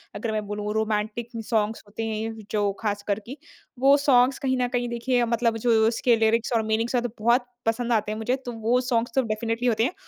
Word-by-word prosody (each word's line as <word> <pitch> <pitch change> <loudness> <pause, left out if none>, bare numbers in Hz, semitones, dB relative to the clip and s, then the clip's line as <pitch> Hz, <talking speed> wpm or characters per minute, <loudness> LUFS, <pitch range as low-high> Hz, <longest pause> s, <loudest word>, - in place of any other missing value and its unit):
अगर 220 +2 -3
मैं 215 -1 -2
बोलूँ 210 0 -3
रोमांटिक 220 +1 -1 0.2
सॉन्ग्स 220 -1 0
होते 210 +2 -6
हैं 220 0 -3
जो 205 -2 +1
ख़ासकर 205 -1 -1
कि 265 +5 -8 0.4
वो 275 +2 +6
सॉन्ग्स 265 -2 +4
कहीं 260 -1 0
ना 250 -1 +1
कहीं 245 0 0
देखिए 240 +1 0
मतलब 230 -1 +1
जो 240 +2 -1 0.2
उसके 235 +1 +2
लिरिक्स 225 +1 +1
और 230 - +3
मीनिंग्स 225 +3 0
हैं 245 - +3
तो 245 - -2
बहुत 240 +3 +3 0.2
पसंद 235 +2 0
आते 215 -2 +1
हैं 215 - -3
मुझे 225 +3 0
तो 245 - -4
वो 230 +2 +1
सॉन्ग्स 240 -1 0
तो 265 - +4
डेफ़िनेटली 230 +2 -2
होते 225 -2 +2
हैं 290 - 0
230 Hz, 215 wpm, -25 LUFS, 220-245 Hz, 0.4 s, वो